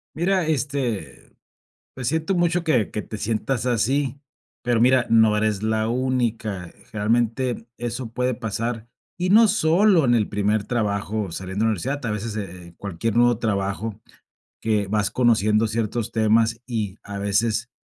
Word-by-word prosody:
Mira, 185 +2 +1
este, 135 -7 -3 0.6
pues, 125 -2 -3
siento 160 +5 0
mucho 175 0 +1
que 130 - +1
que 105 - -3
te 110 - -7
sientas 115 +4 -1
así. 130 +3 0 0.4
Pero 120 -2 +1
mira, 130 0 +4
no 110 -2 +5
eres 105 -1 0
la 110 0 0
única. 115 -7 -1 0.2
Generalmente, 115 +3 0
eso 120 0 -4
puede 125 +1 0
pasar. 115 0 -3 0.3
Y 180 +1 0
no 220 +2 +7
solo 185 -2 +4
en 120 -2 +4
el 110 -3 +2
primer 105 +1 0
trabajo 105 -3 -1
saliendo 95 +4 -4
de - - +3
la - - +3
universidad, 130 +8 -3
a 115 - -1
veces, 105 +1 -3
eh, 90 -4 -7
cualquier 100 +3 -3
nuevo 120 -1 +4
trabajo, 100 -1 -2 0.6
que 105 -3 0
vas 105 0 0
conociendo 110 -3 +3
ciertos 115 0 -2
temas, 115 +1 +2
y 110 -5 -3
a 100 0 -7
veces, 110 +3 0
115 Hz, 150 wpm, -23 LUFS, 105-125 Hz, 0.6 s, no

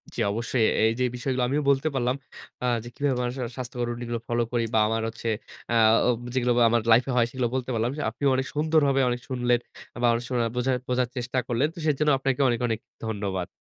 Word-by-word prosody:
জি - - -5
অবশ্যই। 115 +2 0
এ - - +1
এই 110 - +4
যেই 125 -1 +2
বিষয়গুলো 125 0 -1
আমিও 145 +3 0
বলতে 140 +2 +2
পারলাম 125 0 +1 0.5
আ - - +1 0.2
যে 120 - -9
কিভাবে 140 -3 0
মানুষের 125 +1 -3
আ - - -11
স্বাস্থ্যকর 125 -1 -4
রুটিন 120 0 -5
গুলো 115 -1 -2
ফলো 120 0 +1
করি 120 -2 +1
বা 110 - +4
আমার 115 0 0
হচ্ছে 115 +1 -6 0.4
আ - - +1 0.3
ও - - +4 0.2
যেগুলো 125 -1 +1
আবার 120 -1 +5
আমার 120 0 +3
লাইফে 125 +4 +5
হয় 120 - +5
সেগুলো 125 -2 -1
বলতে 130 -1 -2
পারলাম। 115 +2 0
সে - - -3
আপনিও 140 +5 0
অনেক 130 - 0
সুন্দরভাবে 150 -3 +3
অনেক 120 0 -2
শুনলেন 125 -2 +1 0.4
আ - - -10
বা 120 - +4
অনেক 115 +1 -1
শোনা 120 -2 +1
বোঝা 125 +2 +1 0.2
বোঝার 125 0 +1
চেষ্টা 125 +1 -3
করলেন। 125 +4 +1
তো - - -23
সেজন্য 150 0 +2
আপনাকে 135 0 0
অনেক, 120 - 0
অনেক 115 -1 -1 0.3
ধন্যবাদ। 100 -4 -3
125 Hz, 230 wpm, -26 LUFS, 120-130 Hz, 0.5 s, আবার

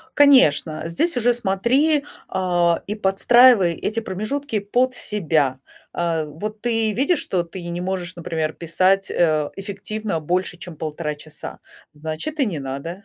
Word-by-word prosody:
Конечно, 215 - +5
здесь 245 - 0
уже 245 0 +3
смотри, 255 +9 +2 0.2
а, 175 -2 +1
и 210 - -3
подстраивай 210 -1 +5
эти 220 +6 -2
промежутки 220 +6 -3
под 245 +6 0
себя. 155 - 0 0.3
А, 165 -2 -1
вот 210 +9 -7
ты 225 -2 +1
видишь, 280 - +1
что 180 -2 -1
ты 175 +1 -9
не 170 +1 -4
можешь, 180 -1 -4
например, 160 -2 -2
писать, 185 +4 +1
э, 155 -3 +1
эффективно 200 -2 -4
больше, 180 +3 -1
чем 175 -3 -10
1,5 155 0 -4
часа. 150 +1 -10 0.4
Значит, 160 - -5
и 265 - +3
не 170 -7 -3
надо. 140 +8 -6
185 Hz, 145 wpm, -21 LUFS, 165-220 Hz, 0.4 s, Конечно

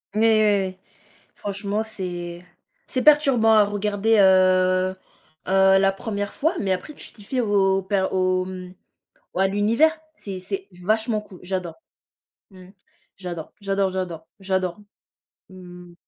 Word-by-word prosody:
Ouais 215 - +1
ouais 225 -1 +5 0.3
ouais. 185 0 -8 0.6
Franchement, 205 +1 -3
c'est 175 -5 -6 0.4
c'est 255 - -2
perturbant 275 -7 +5
à 210 -1 +6
regarder, 205 +2 0
heu 185 -1 +4 0.5
heu, 190 0 +5
la 195 0 +3
1re 200 0 -4
fois, 320 +4 0
mais 195 - -2
après 185 +12 -4
tu - - -9
t'y 205 - -15
fais 255 +4 -2
au 195 -3 +2
per 190 0 0
au, 185 0 +1
hem 185 -1 -8 0.6
au - - -5
à 195 - +4
l'univers. 220 +11 +3 0.2
C'est 195 -7 -7
c'est 385 - -5 0.2
vachement 220 +2 +1
cool. 195 -3 -14
J'adore. 180 -3 -4 0.7
Mmh. 185 -1 -15 0.5
J'adore 175 -4 -7
j'adore 195 -1 0
j'adore 175 -4 -5
j'adore. 190 -2 -2 0.7
Mmh. 180 -1 -13
195 Hz, 140 wpm, -23 LUFS, 185-210 Hz, 0.7 s, à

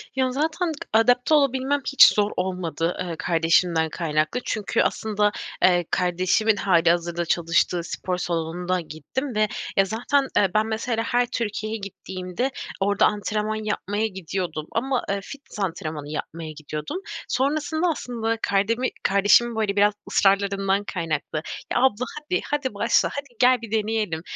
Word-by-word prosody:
Ya 260 -1 +1
zaten 320 +5 -1 0.2
adapte 245 +6 +4
olabilmem 275 -1 +2
hiç 275 - +8
zor 210 0 +1
olmadı, 180 -3 -2
eee, 175 -2 -3
kardeşimden 165 0 +2
kaynaklı 155 +5 -1
çünkü 215 -2 0
aslında, 210 -1 +1 0.3
eee, 175 -1 +4
kardeşimin 185 +5 +2
hâlihazırda 170 -2 +2
çalıştığı 170 +1 +1
spor 180 +1 -3
salonunda 175 +1 -2
gittim 170 - -5
ve 215 0 +3 0.3
ya 195 - +5
zaten, 245 +7 0
eee, 200 - +4
ben 215 +1 +3
mesela 225 +1 -1
her 245 +1 +1
Türkiye'ye 215 0 -2
gittiğimde 190 +3 -4 0.3
orada 200 +1 +3
antrenman 210 +1 -1
yapmaya 210 0 -1
gidiyordum 180 -5 -4
ama, 255 +2 0
eee, 200 0 0
fitness 275 -1 -10
antrenmanı 155 -6 -3
yapmaya 160 +1 -5
gidiyordum. 150 - -6 0.3
Sonrasında 310 +6 0
aslında 230 -6 -2
kardemi 225 +6 +1 0.2
kardeşimin 210 +4 +4
böyle 215 -3 0
biraz 205 +1 +4 0.2
ısrarlarından 195 0 +2
kaynaklı. 160 -4 -2 0.3
Ya, - - +2
abla 255 -2 +2
hadi. 305 +5 -2
Hadi 285 -5 -1
başla, 200 - +2
hadi 285 0 -4
gel, 250 -1 +5
bir 230 -3 -9
deneyelim. 215 -6 -1
205 Hz, 135 wpm, -24 LUFS, 175-240 Hz, 0.3 s, hiç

